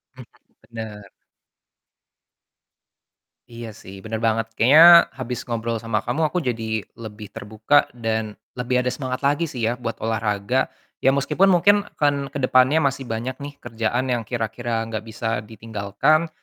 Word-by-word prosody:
Mhm, 130 -1 -11 0.4
bener. 110 -3 -8 2.4
Iya 115 -1 -8
sih, 95 - -11
bener 110 0 -4
banget. 115 0 +1
Kayaknya 145 +8 +7 0.4
habis 125 -2 -4
ngobrol 115 -1 -2
sama 110 -1 -2
kamu 160 - -1
aku 180 - -4
jadi 110 -2 -2 0.2
lebih 105 -2 -8
terbuka 110 +7 +1
dan 110 -2 -2 0.2
lebih 125 +1 -1
ada 125 - 0
semangat 130 -2 -4
lagi 145 +4 +1
sih 125 - -6
ya 115 - +1
buat 115 -1 -4
olahraga. 110 +2 0 0.3
Ya 135 - +3
meskipun 150 +7 +2
mungkin 190 +2 +5 0.2
kan 145 -1 +1
ke - - -3
depannya 130 +5 +4
masih 135 -1 -1
banyak 115 +3 -3
nih 145 0 -7
kerjaan 115 +3 -1
yang 120 -2 0
kira-kira 115 0 -2
nggak 110 -1 -4
bisa 115 +1 -5 0.2
ditinggalkan. 110 +8 0
115 Hz, 145 wpm, -22 LUFS, 110-130 Hz, 2.4 s, Kayaknya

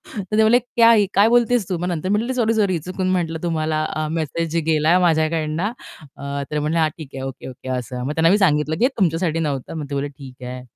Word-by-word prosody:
तर 210 0 -3
ते - - +5
म्हणाले, 230 +3 +5
"क्या 235 -1 +4
है 225 - +5
ये? - - +2
काय 200 +2 +5
बोलतेस 240 -3 +2
तू?" 180 - -1
मग 175 +2 -3
नंतर 175 0 -2
मी 205 - +3
म्हटलं, 235 +4 -2
"सॉरी, 230 -3 +1
सॉरी. 200 -5 +1
चुकून 185 +1 -2
म्हटलं, 165 -3 -2
तुम्हाला, 155 -2 -1
अ, 155 0 -1
मेसेज 165 +1 -2
गेलाय 160 +2 +3
माझ्याकडून." 160 -2 +1
अ, 205 +5 -1 0.5
तर 140 0 -4
ते 150 - 0
म्हणाले, 155 +3 0
"हां, 160 -1 +3
ठीक 155 -5 -9
आहे, 135 - -6
ओके 135 -1 -7
ओके." 130 0 -10
असं. 125 0 -5
मग 145 - -2
त्यांना 160 +1 +3
मी 200 - +5
सांगितलं, 155 -5 +2
की - - 0
"हे - - +3
तुमच्यासाठी 165 -3 +1
नव्हतं." 145 -5 -3
मग 150 - -4
ते 140 - -3
म्हणाले, 140 +1 -2
"ठीक 130 -2 -12
आहे." 125 0 -6
165 Hz, 250 wpm, -21 LUFS, 150-195 Hz, 0.5 s, ते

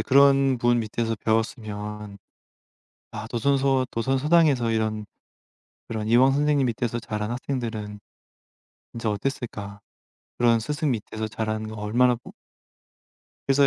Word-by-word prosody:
그런 135 +2 +5
분 120 0 +2
밑에서 115 +1 -2
배웠으면 105 -2 -2 0.9
아 110 0 -6
도산서원 135 +2 +1
도선서당에서 135 +1 +2
이런 110 -1 -1 0.9
그런 110 -1 -3
이황 125 +4 +5
선생님 145 0 +2
밑에서 120 0 -2
자란 105 -1 -4
학생들은 115 -5 -4 0.9
진짜 115 -2 -3
어땠을까? 105 -3 -4 0.6
그런 115 -1 +4
스승 145 +4 -1
밑에서 110 -1 -3
자라는 110 0 -3
거 110 - -7
얼마나 120 +4 +2
부 120 - -13 1.2
그래서 140 +1 +5
115 Hz, 275 characters per minute, -25 LUFS, 110-135 Hz, 1.2 s, 그런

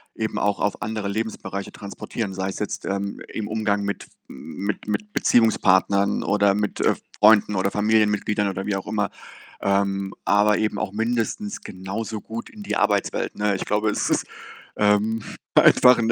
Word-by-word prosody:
eben 110 -1 -3
auch 100 0 0
auf 105 - -1
andere 110 -2 -3
Lebensbereiche 100 -2 -4
transportieren. 100 +1 -5
Sei 95 0 -2
es - - -6
jetzt, 105 - -4
ähm, 100 +1 -3
im 110 -2 -4
Umgang 105 -2 0
mit 100 0 -3
f - - -18 0.2
mit 100 +8 -5
mit 210 - -3
Beziehungspartnern 100 - +3
oder 100 -1 +3
mit, 105 0 -2
äh, - - +4 0.3
Freunden 105 -1 +6
oder 95 +1 +1
Familienmitgliedern 105 -1 +2
oder 95 0 -3
wie 100 - 0
auch 95 - -4
immer, 105 -2 -1 0.5
ähm, 100 0 0
aber 105 +1 +3
eben 110 -1 0
auch 95 - -2
mindestens 115 - -2
genauso 100 +4 -5
gut 115 +1 -7
in 215 - -11
die 205 - -3
Arbeitswelt, 100 -1 0
ne? 105 -1 +1
Ich 95 - -4
glaube, 105 +1 +1
es 105 - -1
ist, - - +1 0.5
ähm, 105 +2 +2 0.3
einfach 125 -1 +7
'n 115 0 +1
105 Hz, 170 wpm, -23 LUFS, 100-110 Hz, 0.5 s, einfach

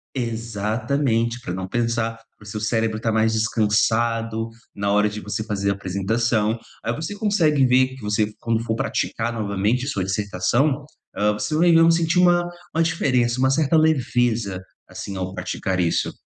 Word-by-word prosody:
Exatamente, 115 +1 -1
pra 90 - -5
não 95 0 -4
pensar, 115 0 -1 0.2
para - - -17
o - - -15
seu 105 +1 -5
cérebro 110 0 0
está 115 0 -1
mais 110 0 +2
descansado 115 +1 +1 0.3
na 100 0 -1
hora 105 +1 +3
de 105 +1 -7
você 105 +1 -3
fazer 100 -2 -1
a - - +2
apresentação. 105 +4 0 0.3
Aí 120 - -1
você 160 +6 -5
consegue 170 - +2
ver 130 +1 +4
que 130 - -13
você, 105 0 0
quando 115 -1 0
for 110 -1 -1
praticar 120 0 -2
novamente 105 +4 0
a - - -3
sua 100 -9 -1
dissertação, 105 +9 0 0.3
hã, 105 +1 +2
você 105 +8 -2
vai 170 +2 +4
ver 165 0 +6
sentir 165 +1 +2
uma 175 -1 +5 0.3
uma 165 - +3
diferença, 130 -7 +1
uma 130 0 +3
certa 155 +2 +2
leveza, 120 -10 +1 0.3
assim, 100 - -7
ao 95 0 -4
praticar 95 -1 -2
isso. 85 -2 +1
115 Hz, 170 wpm, -22 LUFS, 105-130 Hz, 0.3 s, ver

